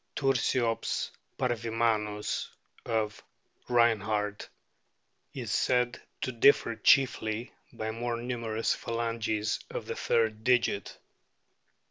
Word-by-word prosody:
Tursiops 125 -3 +1 0.3
parvimamLS, 115 -3 0 0.4
of 110 -2 -1 0.5
Reinhardt,* 110 -3 +1 0.9
is - - -4
said 125 -1 +1 0.2
to 130 - -1
differ 115 -1 +4
chiefly 115 -2 +2 0.2
by 110 0 -4
more 120 +1 -3
numerous 115 -2 -1
phalanges 115 -2 -1
of - - -5
the - - -4
third 110 -1 +1
digit. 120 -5 +1
115 Hz, 85 wpm, -29 LUFS, 110-120 Hz, 0.9 s, differ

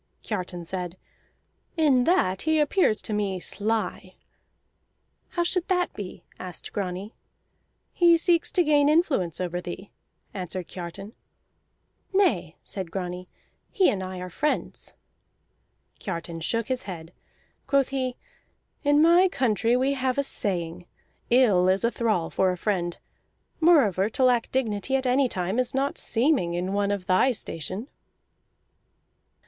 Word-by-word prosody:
Kiartan 180 -4 -4
said: 180 0 -4 0.8
"In 275 -6 +4
that 190 - +2
he 315 0 +2
appears 300 - +2
to 215 - -3
me 200 -3 -1
sly." 215 +4 -2 1.1
"How 345 - 0
should 355 0 -1
that 360 -2 +1
be?" 200 -3 -8 0.2
asked 180 -2 -8
Grani. 195 +2 -4 0.8
"He 340 -1 +5
seeks 340 0 +2
to 360 - +4
gain 295 -2 +4
influence 290 - +1
over 180 -1 -2
thee," 180 +3 -8 0.4
answered 185 -2 -5
Kiartan. 190 +4 -8 1.0
"Nay," 230 - +2
said 190 -4 -5
Grani, 180 0 -5 0.4
"he 385 -4 +3
and 195 - -3
I 185 0 -5
are 180 - -6
friends." 300 - -2 1.0
Kiartan 170 -3 -5
shook 230 +7 -1
his 255 -4 -2
head. 165 -1 -8 0.5
Quoth 275 -2 +2
he: 260 -2 -2 0.7
"In 290 +1 +4
my 345 +3 +6
country 240 - +1
we 265 +2 +1
have 260 -1 -1
a 280 - +2
saying: 175 -8 -2 0.4
'Ill 210 -8 +4
is 190 +3 +2
a 235 - +2
thrall 215 -10 0
for 190 -1 +2
a 180 - -4
friend.' 175 -3 -1 0.6
Moreover, 220 - +4
to 260 +4 -1
lack 245 -2 +3
dignity 255 0 0
at 265 0 0
any 255 +1 +3
time 185 +4 -1
is 255 0 -1
not 275 +1 0
seeming 230 - +1
in 180 +2 -2
one 200 0 +1
of 200 -2 -2
thy 185 +8 +4
station." 200 - -2
210 Hz, 135 wpm, -26 LUFS, 180-275 Hz, 1.1 s, my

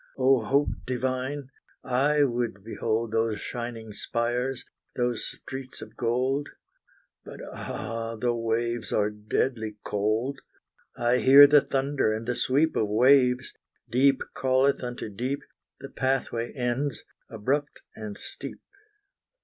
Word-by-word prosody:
O, 130 -2 +4
Hope 140 +6 +2 0.2
divine 130 +2 -2 0.2
' - - -35
I 140 +4 +2
would 120 -6 -1
behold 115 0 -2
Those 115 -2 0
shining 115 -2 -6
spires, 120 +4 -2 0.3
those 120 -2 0
streets 130 0 -8
of - - -11
gold: 130 +4 0 0.7
But - - -10
ah! 115 0 -4
the 120 +2 0
waves 115 0 -1
are 105 0 +1
deadly 110 +1 -2
cold! 110 +7 -1 0.6
I 120 +1 +2
hear 135 +3 +9
the 145 0 +6
thunder 135 -4 0
and 110 +1 -3
the 125 - 0
sweep 145 +6 +1
Of 110 - +1
waves; 125 +3 +4 0.4
deep 135 +2 +4
calleth 130 +1 +2
unto 120 -2 -4
deep; 125 +7 -3 0.4
The 135 - -7
pathway 130 -3 -1
ends, 125 0 -2 0.3
abrupt 145 +6 -2
and 105 -2 -7
steep. - - -6
125 Hz, 125 wpm, -27 LUFS, 115-135 Hz, 0.7 s, hear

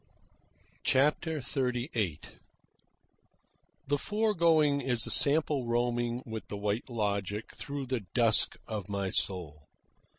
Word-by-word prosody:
'" - - -34
CHAPTER 150 +3 +1
XXXVIII 120 - -2 1.6
The 145 +1 0
foregoing 165 -8 +2
is 125 -3 +2
a - - 0
sample 145 -3 +4
roaming 120 +1 0
with 110 -1 -7
the 100 - -6
White 105 +4 -2
Logic 105 -2 -2
through 140 -1 -5
the 130 -1 -2 0.2
dusk 115 -3 +3
of 105 -2 -5
my 100 -1 -2
soul. 80 -7 -3
120 Hz, 110 wpm, -30 LUFS, 105-145 Hz, 1.6 s, sample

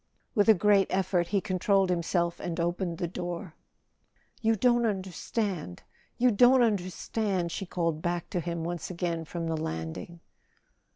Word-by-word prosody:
With 210 -2 +3
a 220 - +9
great 200 0 +4
effort 185 -2 +1
he 200 - +1
controlled 190 0 +2
himself 170 0 0
and 170 -1 -4
opened 175 0 -1
the 175 - -2
door. 175 0 -5 0.9
"You 225 0 +3
don't 240 +2 +3
understand—you 195 - -2
don't 245 +4 +6
understand!" 190 -2 -1
she 195 - -4
called 165 -3 -1
back 175 0 -2
to 180 - 0
him 170 -1 -3
once 175 0 -4
again 170 -2 -2
from 170 +1 -4
the 165 0 -1
landing. 120 - -5
180 Hz, 140 wpm, -29 LUFS, 170-200 Hz, 0.9 s, a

